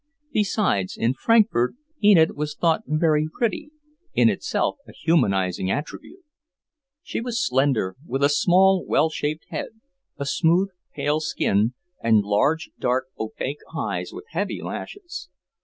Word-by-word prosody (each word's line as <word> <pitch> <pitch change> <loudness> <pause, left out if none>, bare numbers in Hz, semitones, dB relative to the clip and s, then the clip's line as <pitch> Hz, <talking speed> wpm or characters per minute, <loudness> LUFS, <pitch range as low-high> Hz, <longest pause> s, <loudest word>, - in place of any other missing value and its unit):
Besides, 195 - 0
in 115 +2 +1
Frankfort, 210 - +3 0.3
Enid 180 -6 +6
was 150 0 -3
thought 165 +4 +2
very 155 0 +2
pretty, 245 - -2 0.5
in - - +5
itself - - -1
a - - -11
humanizing 95 - +1
attribute. 150 - -5 0.8
She - - -4
was 235 -1 -1
slender, 130 -8 +1
with 135 +2 -1
a - - +7
small, 185 +5 +4
well 155 +2 +2
shaped 155 +1 -3
head, 220 - -6 0.4
a 140 - -3
smooth, 170 +7 +2 0.3
pale 150 +1 0
skin, 115 -6 +1 0.3
and 110 -2 +4
large, 140 +11 +1
dark, 130 +1 0
opaque 130 +6 -4 0.2
eyes - - -2
with - - -9
heavy - - -2
lashes. 380 -4 -7
150 Hz, 130 wpm, -24 LUFS, 125-190 Hz, 0.8 s, a